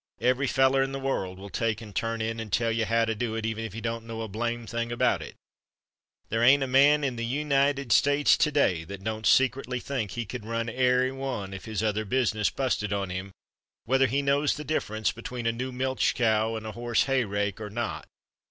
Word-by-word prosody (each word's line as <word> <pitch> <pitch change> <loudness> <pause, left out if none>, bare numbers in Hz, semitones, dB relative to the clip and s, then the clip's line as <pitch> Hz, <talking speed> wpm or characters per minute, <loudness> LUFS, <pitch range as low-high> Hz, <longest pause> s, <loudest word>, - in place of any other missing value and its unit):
Every 130 +2 +2
feller 135 +1 +3
in 135 0 -1
the 135 - -3
world 95 -9 -2
will 100 +1 -10
take 115 +4 -1
and 105 -4 -11
turn 115 0 -1
in 115 +1 -3
and 110 -2 -6
tell 115 +2 +1
you 115 0 0
how 115 +1 +2
to 110 - -1
do 110 0 -3
it, 110 -1 -3
even 110 0 -2
if 110 -4 -6
he 115 - -6
don't 115 0 -3
know 115 0 -5
a - - -4
blame 115 +3 -3
thing 115 +1 -3
about 120 - +1
it. - - -9 0.9
There 115 +1 0
ain't 135 +3 +6
a - - +1
man 140 +3 +5
in 130 -3 -1
the 115 - -3 0.2
United 140 -3 +1
States 145 +3 +5
to 150 - +2
day 95 - +2
that 95 +2 -8
don't 110 +1 -2
secretly 130 -1 +2
think 125 -6 -3
he 120 -1 -3
could 115 +2 -6
run 115 +1 -2
airy 125 +1 +2
one 130 -8 -4
if 95 - -8
his 110 -1 -3
other 110 0 0
business 110 -2 +1
busted 125 -6 -1
on 100 -2 -2
him, 95 +2 -5 0.5
whether 135 +2 +3
he 140 +4 0
knows 140 +1 +2
the 150 - -6
difference 110 -8 -1
between 120 +1 -7
a 115 - +3
new 130 +3 -4
milch 130 +1 0
cow 110 -1 +2
and 110 0 -6
a 110 - -4
horse 120 0 +1
hayrake 105 -6 -1
or 105 - -5
not. 120 +3 -4
115 Hz, 225 wpm, -27 LUFS, 110-130 Hz, 0.9 s, ain't